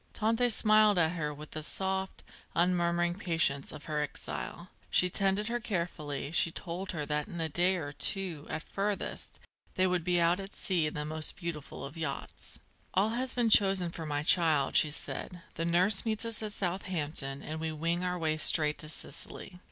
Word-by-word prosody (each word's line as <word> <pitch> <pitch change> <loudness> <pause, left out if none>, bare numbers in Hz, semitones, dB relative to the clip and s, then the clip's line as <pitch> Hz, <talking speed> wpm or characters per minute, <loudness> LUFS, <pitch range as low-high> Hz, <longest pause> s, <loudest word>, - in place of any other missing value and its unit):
Tante 230 +3 +2
smiled 215 -2 +5
at 160 -2 +4
her 155 -4 -2
with 150 +1 -10
the 155 - -4
soft, 190 +4 -2 0.3
unmurmuring 175 0 +2
patience 160 -7 +1
of - - -10
her 150 -1 -1
exile, 160 +4 -5 0.2
she 180 0 +3
tended 195 +3 +2
her 240 +1 -1
carefully, 170 - -3
she 165 - +4
told 175 +3 -5
her 150 -4 -3
that 150 0 -1
in 175 - -7
a 165 - 0
day 175 +4 +3
or 150 -5 -4
two, 170 -1 +1
at 160 - -3
furthest, 200 0 -3 0.4
they 185 - +3
would 180 -2 +1
be 175 0 +2
out 170 +2 +3
at 195 0 -8
sea 175 -5 +1
in 150 - -5
the 150 - -2
most 155 0 -4
beautiful 170 -6 -6
of 145 +4 -9
yachts. 155 -4 -5 0.4
"All 200 +3 +3
has 255 +3 -2
been 235 -3 +2
chosen 195 -4 +4
for 165 -2 -6
my 145 0 -1
child," 155 -4 +3
she 155 - +6
said. 170 +3 -4
"The 165 - -3
nurse 180 +4 +4
meets 220 0 -1
us 230 -1 -3
at 215 -1 -4
Southampton 165 -8 -3
and 155 +1 -5
we 160 0 -2
wing 165 +3 -1
our 180 0 -1
way 155 -2 0
straight 150 -1 +3
to 155 - -2
Sicily." 180 +3 -7
175 Hz, 190 wpm, -31 LUFS, 155-190 Hz, 0.4 s, she